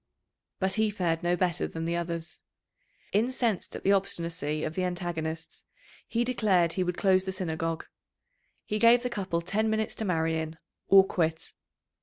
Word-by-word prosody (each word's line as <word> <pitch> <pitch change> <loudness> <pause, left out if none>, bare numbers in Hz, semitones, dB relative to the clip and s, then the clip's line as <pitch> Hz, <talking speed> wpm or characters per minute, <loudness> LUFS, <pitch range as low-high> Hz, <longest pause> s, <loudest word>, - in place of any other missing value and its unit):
But 190 0 0
he 220 - +3
fared 175 -5 -1
no 175 0 +2
better 180 -1 0
than 165 0 -5
the 170 +1 0
others. 170 -1 -4 0.7
Incensed 230 -1 0
at - - -7
the 195 - +4
obstinacy 165 -6 -1
of 155 - -2
the 185 - -1
antagonists, 170 -3 -4 0.4
he 235 +1 0
declared 200 -9 +2
he 185 - 0
would 180 0 -2
close 190 -2 +3
the 190 - -2
Synagogue. 165 -3 -2 0.8
He 210 - -2
gave 235 +2 +6
the 250 - -2
couple 190 -6 -2
ten 215 +5 0
minutes 220 0 0
to 220 - -1
marry 160 -3 +1
in 160 0 -5 0.3
or 195 0 +8
quit. 165 -3 -1
180 Hz, 165 wpm, -28 LUFS, 165-200 Hz, 0.8 s, or